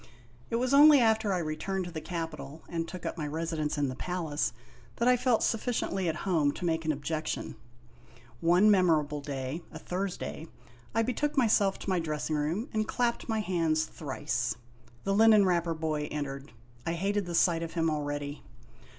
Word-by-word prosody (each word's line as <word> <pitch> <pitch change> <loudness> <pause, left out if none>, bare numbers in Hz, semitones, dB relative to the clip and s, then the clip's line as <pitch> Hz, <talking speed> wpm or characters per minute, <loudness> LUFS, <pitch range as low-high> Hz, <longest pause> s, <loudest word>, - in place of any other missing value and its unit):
It - - -1
was 250 +3 +1
only 290 0 +9
after 220 -3 +3
I 185 - +1
returned 175 +4 -2
to 175 - -7
the 160 -2 -5
capital 160 -4 -6
and 165 -1 -3
took 180 0 -8
up - - -4
my 150 - -2
residence 155 -1 -2
in 145 -1 +1
the 130 - -4
palace, 165 -2 -2 0.4
that 235 - 0
I 250 - +6
felt 250 -2 +2
sufficiently 215 -6 0
at 160 - -1
home 155 -7 +2
to 180 - -5
make 165 -1 0
an 155 - +2
objection. 155 +2 -3 0.8
One 180 - +5
memorable 155 -6 +3
day, 140 +2 -4
a 160 - -8
Thursday, 180 -2 -4 0.5
I 225 - +3
betook 290 +5 -1
myself 210 -6 +3
to - - -6
my 185 - +2
dress 155 -1 -3
ing - - +2
room 160 - -1
and 215 0 0
clapped 240 -1 -1
my 220 -1 +1
hands 165 -5 +1
thrice. - - -3 0.5
The 195 - 0
linen 215 -1 +6
wrapper 170 -2 +1
boy 155 -2 -2
entered. 140 -1 -5 0.3
I 165 - -1
hated 200 +2 -1
the 170 - -3
sight 165 -1 +3
of 165 -1 -5
him 165 -1 +1
already. 145 -1 -3
170 Hz, 180 wpm, -29 LUFS, 155-205 Hz, 0.8 s, only